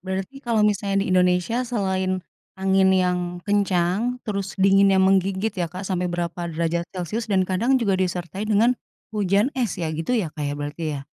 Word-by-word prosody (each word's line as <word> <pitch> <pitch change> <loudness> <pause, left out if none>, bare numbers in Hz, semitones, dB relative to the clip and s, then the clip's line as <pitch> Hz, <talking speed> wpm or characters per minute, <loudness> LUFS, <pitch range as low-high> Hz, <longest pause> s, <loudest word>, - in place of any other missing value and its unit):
berarti 190 +8 -5
kalau 230 -5 +1
misalnya 200 -1 +1
di 185 - -1
Indonesia 180 +5 +2
selain 190 -5 -1 0.3
angin 190 0 +3
yang 180 -1 +2 0.3
kencang 200 +3 +1
terus 200 -2 -4
dinginnya 195 0 +5
menggigit 190 +2 +2
ya, 180 -4 -2
Kak, 185 +3 -7
sampai 180 -2 -1
berapa 175 0 -3
derajat 170 +1 -1
celsius 190 +6 -4
dan 190 -2 +2
kadang 225 +9 +1
juga 205 -5 +1
disertai 185 +3 -3
dengan 220 +4 +4 0.4
hujan 205 +5 +1
es 240 -7 -1
ya 160 -3 -2
gitu 165 +11 -1
ya, 175 -9 -2
Kak, 145 -2 -3
berarti 145 +3 -5 0.2
ya? 140 - -14
190 Hz, 165 wpm, -23 LUFS, 180-205 Hz, 0.4 s, dinginnya